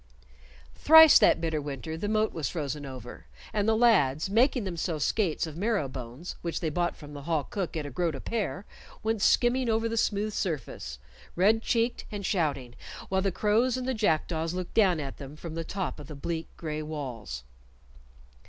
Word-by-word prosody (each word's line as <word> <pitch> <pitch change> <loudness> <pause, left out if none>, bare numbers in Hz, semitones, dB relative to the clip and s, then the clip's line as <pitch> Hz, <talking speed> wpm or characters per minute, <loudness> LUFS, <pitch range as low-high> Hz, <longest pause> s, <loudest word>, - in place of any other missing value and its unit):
Thrice 320 - +8
that - - +5
bitter 160 -2 -1
winter 145 +2 -5
the 175 +6 -3
moat 215 0 +1
was 160 -3 -2
frozen 145 -3 -4
over, 125 -2 -9 0.3
and 210 0 +1
the 220 - +3
lads, 190 - +3
making 245 +2 +3
themselves 170 -4 -2
skates 190 -9 0
of 160 -2 -8
marrow 200 -4 0
bones, 130 +5 -7
which 170 -1 -3
they 160 -3 -2
bought 175 +3 0
from 150 -1 -11
the 145 - -7
hall 155 0 0
cook 180 +1 -4
at 155 - -3
a 145 - -6
groat 165 +3 -1
a - - -6
pair, 205 - -3 0.4
went 220 -1 0
skimming 245 +3 +3
over 225 +1 +1
the 230 0 -3
smooth 210 0 0
surface, 130 - -4 0.4
red 210 +5 +4
checked 235 +1 0
and 205 -2 -5
shouting, 140 - -1 0.4
while 190 0 +1
the 195 0 +1
crows 225 +7 +2
and 255 0 -4
the 260 - +1
jackdaws 165 -5 0
looked 180 -1 -5
down 190 -7 +4
at 140 -2 -5
them 140 0 -9
from 160 +1 -8
the 165 0 -3
top 175 -5 -4
of 145 - -9
the 150 - -8
bleak 160 +3 -4
gray 155 -2 -4
walls. 125 - -6
170 Hz, 190 wpm, -28 LUFS, 150-215 Hz, 0.4 s, Thrice